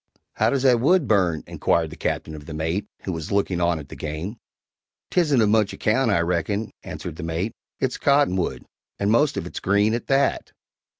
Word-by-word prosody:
"How - - +2
does 135 -2 0
that 125 -3 +5
wood 155 +3 +3
burn?" 90 -7 +2
inquired 80 -2 0
the - - -8
Captain 80 - -3
of 75 -1 -10
the 80 - -6
mate, 80 +6 -2 0.2
who 95 - -3
was 80 -3 -5
looking 100 -3 +1
on 85 -1 +2
at 75 -3 -9
the - - -8
game. 80 +9 -5 0.7
"'Tisn't 150 -9 +3
of 105 - +3
much 105 -2 +2
account, 120 +3 +1
I 95 -5 +3
reckon," 90 +5 -1
answered 80 -2 -7
the - - -6
mate; 85 +6 -2 0.3
"it's 130 -1 -1
cottonwood, 140 -11 +2 0.3
and 100 +1 +1
most 145 +5 +3
of - - -2
it 90 - -6
green 100 +3 +2
at 120 - -3
that." 135 0 +1
100 Hz, 195 wpm, -23 LUFS, 85-120 Hz, 0.7 s, that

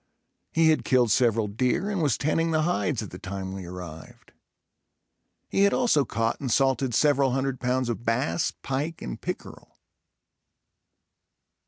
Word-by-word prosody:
He 160 0 +4
had 155 - +1
killed 125 -4 +3
several 115 -2 +3
deer 125 - 0
and 195 -4 -1
was 145 -6 +2
tanning 165 +3 +1
the 155 -1 +1
hides 155 -8 0
at 105 - -9
the 90 - -9
time 95 -1 -5
we 95 -2 -7
arrived. 85 -3 -10 1.2
He - - 0
had 200 0 +4
also 230 - +3
caught 115 0 -1
and 130 -4 -3
salted 135 -1 +2
several 140 -1 +3
hundred 135 -1 -1
pounds 125 0 0
of 120 0 -3
bass, 125 +8 0
pike 145 +5 -3
and - - -6
pickerel. - - -7
130 Hz, 150 wpm, -26 LUFS, 110-150 Hz, 1.2 s, He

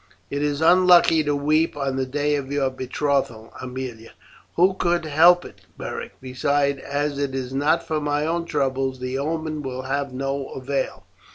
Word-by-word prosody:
"It 140 - -2
is 145 0 -1
unlucky 175 -2 +6
to 145 0 +1
weep 155 +2 +1
on 135 -2 -1
the 130 0 -1
day 145 +2 0
of 140 -2 -2
your 140 -2 +1
betrothal, 130 -3 -2
Aemilia." 125 -3 -7 0.4
"Who 185 +3 +4
could 175 -2 0
help 170 +4 +5
it, - - -13 0.2
Beric? - - -6
Besides, 140 +2 0
as 145 +1 -2
it 140 -2 -2
is 130 -1 -4
not 150 +5 +1
for 155 -1 -1
my 145 0 0
own 170 +1 -1
troubles 135 -4 -1
the 125 +1 -3
omen 155 +1 -2
will 130 -2 -5
have 140 +1 -2
no 135 +1 -3
avail. 135 +1 -3
140 Hz, 170 wpm, -23 LUFS, 130-155 Hz, 0.4 s, unlucky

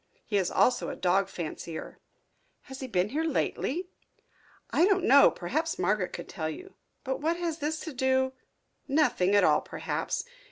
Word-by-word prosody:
He 205 - 0
is 185 -3 +1
also 250 - +2
a - - -5
dog 190 +2 +1
fancier." 165 -1 -6 0.6
"Has 265 0 -10
he 260 - -5
been 185 -3 0
here 305 +6 -1
lately?" 325 +2 -1 0.8
"I 340 - +4
don't 390 -3 +2
know. 280 +2 +7
Perhaps 310 - -2
Margaret 185 +1 0
could - - -7
tell 155 -2 -4
you. 375 - -9 0.3
But 265 +1 -3
what 330 +3 +1
has 340 -2 -3
this 310 +1 -2
to 320 - -6
do 260 0 +1 0.3
" - - -48 0.2
"Nothing 270 -10 +2
at 205 - +5
all, - - +4
perhaps. - - -3
260 Hz, 170 wpm, -28 LUFS, 195-315 Hz, 0.8 s, know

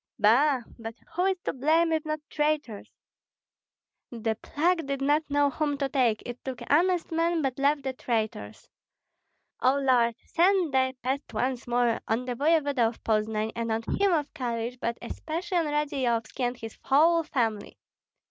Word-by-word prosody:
Ba! 250 +5 +4 0.2
but 225 0 -7 0.2
who 360 +2 +1
is 385 -1 +1
to - - -1
blame, 320 +5 +2
if 315 -1 0
not 310 0 -2
traitors? 295 -9 -2 1.2
The 225 -2 -2
plague 330 0 0
did 275 -1 -2
not 295 +3 +1
know 285 0 +2
whom 290 0 -1
to 275 -1 0
take; 245 -6 +1
it 245 0 -7
took 260 -3 -5
honest 350 +4 +2
men, 330 0 +1
but 265 -1 -2
left 285 +1 +2
the 265 -1 -2
traitors. 220 -3 -3 0.9
O 260 +2 +3
Lord, 245 -4 +3
send 355 -3 +2
thy 260 0 +2
pest 270 +3 -2
once 250 -1 -1
more 240 -1 +1
on 230 +3 0
the 250 - -2
voevoda 285 -3 +2
of 230 - -7
Poznan 215 0 0
and 230 -1 -2
on 220 +1 -1
him 400 -1 +2
of 305 -4 0
Kalish, 240 -3 -3
but 235 -2 -2
especially 330 +8 -3
on 330 - 0
Radzeyovski 270 -7 -1
and 245 -1 -1
his 225 -1 -9
whole 330 +5 +4
family. 230 -9 -2
270 Hz, 165 wpm, -27 LUFS, 235-310 Hz, 1.2 s, Ba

